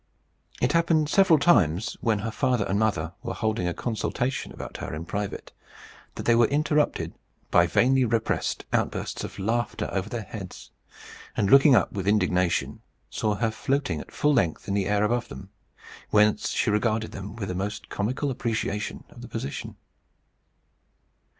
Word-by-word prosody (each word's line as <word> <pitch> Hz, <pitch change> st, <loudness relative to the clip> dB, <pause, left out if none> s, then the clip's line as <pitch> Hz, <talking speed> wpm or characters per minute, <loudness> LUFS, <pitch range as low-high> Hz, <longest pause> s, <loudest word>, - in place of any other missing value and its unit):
It 125 Hz, -, +2 dB
happened 165 Hz, -2 st, +2 dB
several 190 Hz, -2 st, +5 dB
times, 110 Hz, -, +3 dB
when 110 Hz, -2 st, +2 dB
her 115 Hz, -, -2 dB
father 125 Hz, -4 st, +1 dB
and 100 Hz, +1 st, 0 dB
mother 95 Hz, -7 st, 0 dB
were -, -, -4 dB
holding 110 Hz, -5 st, -1 dB
a 90 Hz, -, -1 dB
consultation 125 Hz, +3 st, -2 dB
about -, -, -8 dB
her -, -, -5 dB
in 80 Hz, +2 st, -6 dB
private, 100 Hz, +3 st, -4 dB, 0.6 s
that -, -, -5 dB
they 120 Hz, -, +4 dB
were 115 Hz, -1 st, +5 dB
interrupted 150 Hz, +1 st, +1 dB, 0.4 s
by 85 Hz, 0 st, +5 dB
vainly 130 Hz, +9 st, +3 dB
repressed 115 Hz, -1 st, -1 dB
outbursts -, -, -1 dB
of -, -, -7 dB
laughter 115 Hz, +5 st, -1 dB
over 95 Hz, +1 st, -2 dB
their 115 Hz, -1 st, -4 dB
heads; 100 Hz, -4 st, -9 dB, 0.7 s
and 100 Hz, -1 st, +1 dB
looking 140 Hz, 0 st, +8 dB
up 100 Hz, -, +3 dB
with 95 Hz, -1 st, -4 dB
indignation, 90 Hz, -4 st, +1 dB, 0.3 s
saw 105 Hz, -1 st, 0 dB
her 110 Hz, +1 st, 0 dB
floating 110 Hz, -, -1 dB
at -, -, -13 dB
full 150 Hz, 0 st, +2 dB
length 85 Hz, -, 0 dB
in 100 Hz, -, -1 dB
the 100 Hz, -2 st, 0 dB
air 105 Hz, 0 st, +2 dB
above 120 Hz, +3 st, 0 dB
them, 95 Hz, 0 st, -10 dB, 0.6 s
whence 105 Hz, 0 st, +3 dB
she -, -, +1 dB
regarded 110 Hz, +1 st, 0 dB
them 95 Hz, +1 st, -7 dB
with 105 Hz, -4 st, -4 dB
the -, -, -2 dB
most 100 Hz, +3 st, -4 dB
comical 130 Hz, +7 st, -1 dB
appreciation 110 Hz, -4 st, -3 dB
of -, -, -13 dB
the -, -, -8 dB
position. 70 Hz, -, -5 dB
110 Hz, 165 wpm, -26 LUFS, 100-125 Hz, 0.7 s, looking